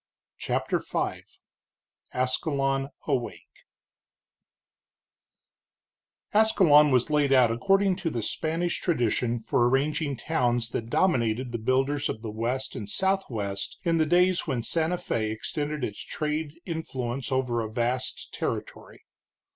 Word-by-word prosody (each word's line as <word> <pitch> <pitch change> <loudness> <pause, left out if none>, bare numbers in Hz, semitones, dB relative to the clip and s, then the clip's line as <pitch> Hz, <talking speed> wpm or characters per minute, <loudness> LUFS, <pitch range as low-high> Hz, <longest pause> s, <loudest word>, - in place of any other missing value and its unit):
CHAPTER - - 0
V - - -2 0.9
ASCALON 135 +1 0 0.2
AWAKE 130 -5 -2 2.8
Ascalon 185 -9 +6
was 130 +2 +2
laid 145 -2 +3
out 125 -4 +5
according 195 +9 +2
to 185 -3 -2
the 120 -7 -3
Spanish 165 +8 -2
tradition 120 - +1
for 120 +2 +2
arranging 140 +1 0
towns 120 -6 0
that 115 0 -4
dominated 120 -7 +1
the 115 - -3
builders 135 +5 +1
of 110 - -5
the 110 - -4
West 120 +5 -2
and 105 -5 -6
Southwest 115 - -1
in 165 -1 +2
the 155 - +3
days 180 +2 +3
when 130 -6 -1
Santa 165 +6 0
Fé 110 -9 -2
extended 145 +6 -3
its 105 -4 -3
trade 150 0 -3
influence 135 -7 -4
over 125 -3 0
a 110 -1 -5
vast 125 +3 -2
territory. - - -5
135 Hz, 120 wpm, -27 LUFS, 120-160 Hz, 2.8 s, Ascalon